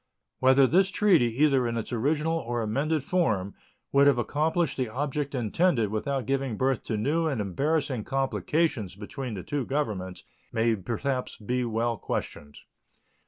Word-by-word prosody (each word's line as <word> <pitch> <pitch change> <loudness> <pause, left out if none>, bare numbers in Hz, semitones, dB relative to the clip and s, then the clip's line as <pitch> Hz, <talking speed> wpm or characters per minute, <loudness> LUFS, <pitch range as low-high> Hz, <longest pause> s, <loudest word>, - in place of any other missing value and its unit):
Whether 130 +1 +6
this 190 +8 +3
treaty, 190 -10 +4 0.2
either 135 -5 +3
in 115 0 -2
its 115 - -4
original 150 +7 0
or 120 -3 -2
amended 140 +7 0
form, 110 - 0 0.4
would 140 +1 +5
have 140 -3 +4
accomplished 155 +6 0
the 130 -3 -2
object 140 +3 -3
intended 120 - +1
without 130 +4 -2
giving 135 -4 -1
birth 130 -2 +1
to 110 - -2
new 155 +9 +1
and 140 -7 -1
embarrassing 135 - -1
complications 135 - -1
between 110 +4 -6
the 90 - -6
two 145 -2 -2
Governments, 105 -10 -3 0.3
may 115 0 +2
perhaps 125 +6 -3
be 125 +4 -2
well 115 0 -1
questioned. 75 -6 -5
130 Hz, 150 wpm, -27 LUFS, 110-150 Hz, 0.4 s, Whether